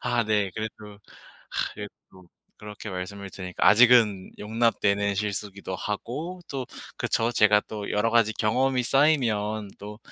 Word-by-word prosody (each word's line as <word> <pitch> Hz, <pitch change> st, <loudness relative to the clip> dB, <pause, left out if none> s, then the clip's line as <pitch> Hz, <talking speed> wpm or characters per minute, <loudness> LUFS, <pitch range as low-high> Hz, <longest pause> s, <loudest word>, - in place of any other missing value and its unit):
아 120 Hz, -2 st, +1 dB
네 105 Hz, -3 st, +1 dB
그래도 105 Hz, -1 st, -7 dB, 0.5 s
아 -, -, -1 dB
이렇게 105 Hz, -1 st, -6 dB, 0.2 s
또 95 Hz, -1 st, -17 dB, 0.3 s
그렇게 105 Hz, 0 st, -8 dB
말씀을 95 Hz, +2 st, -6 dB
들으니까 90 Hz, -2 st, -3 dB
아직은 110 Hz, -4 st, +5 dB
용납되는 105 Hz, -2 st, +1 dB
실수기도 100 Hz, -1 st, -4 dB
하고 150 Hz, -, -5 dB
또 135 Hz, -3 st, -4 dB, 0.3 s
그렇죠. 115 Hz, +1 st, 0 dB
제가 105 Hz, -2 st, +5 dB
또 105 Hz, -2 st, -6 dB
여러 110 Hz, +2 st, +1 dB
가지 115 Hz, -2 st, +3 dB
경험이 125 Hz, +5 st, +1 dB
쌓이면 115 Hz, -7 st, +1 dB
또 105 Hz, +1 st, -9 dB
105 Hz, 305 characters per minute, -26 LUFS, 100-115 Hz, 0.5 s, 아직은